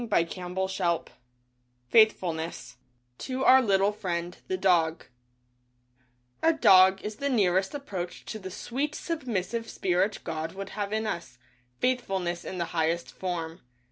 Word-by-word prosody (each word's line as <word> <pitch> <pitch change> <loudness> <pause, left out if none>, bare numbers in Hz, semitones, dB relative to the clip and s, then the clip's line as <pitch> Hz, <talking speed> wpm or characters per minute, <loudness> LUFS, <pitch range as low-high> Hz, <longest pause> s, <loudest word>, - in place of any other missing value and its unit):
DAY 220 -8 +2
DREAMS 185 +2 -4 1.1
FAITHFULNESS 165 - +2 0.4
(To 260 0 -3
Our 265 +1 +8
Little 200 -3 +3
Friend 175 -4 -3
— - - -37
The 375 - -1
Dog) 170 - +2 1.4
A 325 - +5
dog 190 -9 +6
is 210 0 -5
the 280 +3 -1
nearest 190 -3 +2
approach 185 -11 -6
to 220 - -6
the 190 -2 -7
sweet 275 +10 -3
sub 320 -6 -4
missive 230 +2 -2
spirit 185 +3 0
God 160 0 -4
would 195 0 -6
have 205 -1 -4
in 220 +1 -1
us, 170 - -5 0.4
Faithfulness 195 - -1
in 185 - -6
the 170 - -1
highest 165 +1 0
form. 170 -3 -4
190 Hz, 140 wpm, -28 LUFS, 175-220 Hz, 1.4 s, Our